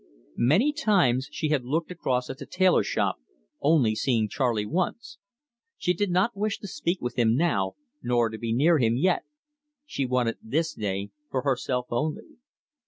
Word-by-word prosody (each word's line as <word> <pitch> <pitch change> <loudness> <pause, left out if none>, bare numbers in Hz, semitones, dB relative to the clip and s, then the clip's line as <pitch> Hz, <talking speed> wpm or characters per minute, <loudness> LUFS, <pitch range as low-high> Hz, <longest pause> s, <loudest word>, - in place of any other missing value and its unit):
Many 195 - +4
times 135 - +2
she 155 - -2
had 145 -4 +1
looked 160 +7 -2
across 130 -8 -1
at 130 - -10
the - - -8
tailor 185 -1 +3
shop, - - -1 0.4
only 140 -7 +3
seeing 110 -1 +1
Charley 115 -2 0
once. 230 - -3 0.6
She 180 - +1
did 205 +3 -1
not 185 +6 +1
wish 210 +1 -1
to 205 - -6
speak 180 -1 -2
with 125 +1 -3
him 115 -1 +4
now, 125 - +1 0.3
nor 120 -2 +1
to 110 0 -8
be 115 -1 -3
near 150 +7 +4
him 115 -1 +2
yet; 180 +6 +1 0.6
she 140 - -2
wanted 125 -2 0
this 155 +8 -1
day 100 -1 -3 0.2
for 130 - -2
herself 130 -2 0
only. 150 - -3
135 Hz, 170 wpm, -26 LUFS, 120-175 Hz, 0.6 s, Many